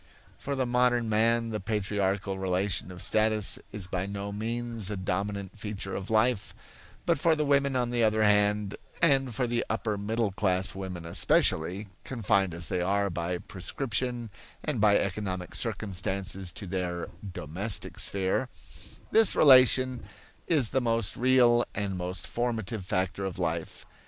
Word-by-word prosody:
For 140 - -4
the 130 -1 0
modern 120 -1 +2
man 115 +2 +2
the 105 - -2
patriarchal 100 -1 -1
relation 95 0 -1
of 90 -1 -6
status 110 -1 +2
is 105 -3 -3
by 90 +1 -3
no 100 0 -5
means 115 0 -3
the 105 -1 -3
dominant 100 +2 -3
feature 105 -2 -5
of 95 - -5
life; 110 0 +1 0.5
but - - +2
for 165 0 +3
the 150 -1 0
women 140 -1 +2
on 120 -1 0
the 120 -1 +1
other 110 -1 +3
hand, 105 -1 +2 0.2
and 135 -7 +3
for 125 - +1
the 120 0 0
upper 105 -3 -1
middle 110 +1 -1
class 95 -1 0
women 95 -3 -6
especially, 85 +3 +2 0.2
confined 100 -7 0
as 85 0 -4
they 90 - -1
are 100 +2 +1
by 85 +1 -2
prescription 120 +5 -3 0.3
and 145 -8 -1
by 105 -1 +5
economic 95 -2 -3
circumstances 95 -3 -1
to 105 - -6
their 90 -2 -3 0.2
"domestic 95 +9 -3
sphere," 100 +6 0 0.6
this 225 -1 +5
relation 130 -2 +6 0.5
is 145 -10 +2
the 130 - +1
most 115 -4 0
real 120 -1 +4
and 100 -1 -2
most 90 +1 -3
formative 115 -3 -2
factor 95 +1 -1
of 95 -3 -4
life. 80 0 -3
105 Hz, 150 wpm, -28 LUFS, 95-120 Hz, 0.6 s, relation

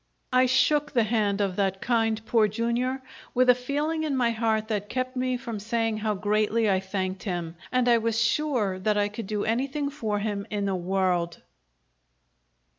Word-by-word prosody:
I 255 0 +5
shook 290 +3 +2
the 235 -3 +4
hand 210 -2 +1
of 195 -2 0
that 195 -1 0
kind 225 -2 0
Poor 225 -2 +3
Jr. 235 +4 0 0.4
with 250 0 +6
a - - +5
feeling 290 +6 -2
in 290 -4 -1
my 240 -2 +2
heart 220 -1 0
that 210 -2 -2
kept 255 0 -2
me 255 0 0
from 235 -4 -5
saying 225 +1 -1
how 215 -1 -1
greatly 215 +2 +1
I 190 -2 +3
thanked 190 0 -3
him 175 -4 -4 0.2
and 255 -1 +2
I 235 -1 +5
was 225 0 0
sure 235 -7 +1
that 210 +2 +1
I 205 0 +2
could 210 0 -7
do 210 0 -1
anything 275 +5 -1
for 220 -8 -2
him 205 -1 -3
in 205 -1 -2
the 195 - 0
world! 180 -2 -1
220 Hz, 185 wpm, -26 LUFS, 200-250 Hz, 0.4 s, with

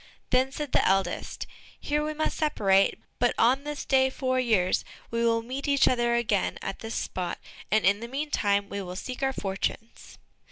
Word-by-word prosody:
Then 255 +1 +3
said 295 -1 -5
the - - +3
eldest, 195 0 0 0.3
"Here 295 +1 0
we 305 0 -3
must 310 - -1
separate, 195 -11 +2 0.2
but 245 0 +2
on 260 +5 +3
this 295 -1 -4
day 265 -1 +4
four 255 -1 -1
years, 215 -7 +2 0.3
we 230 0 0
will 230 -1 +2
meet 265 +5 -5
each 280 -1 +4
other 240 -1 +2
again 215 -4 0
at 195 - -5
this 225 0 -5
spot, 180 -2 -3 0.3
and 215 0 +2
in 200 +2 +4
the 235 - -6
meantime 230 -7 0
we 200 0 -4
will 180 -1 -6
seek 250 +7 -6
our 270 0 +2
fortunes." 205 +1 -4
235 Hz, 185 wpm, -27 LUFS, 200-270 Hz, 0.3 s, day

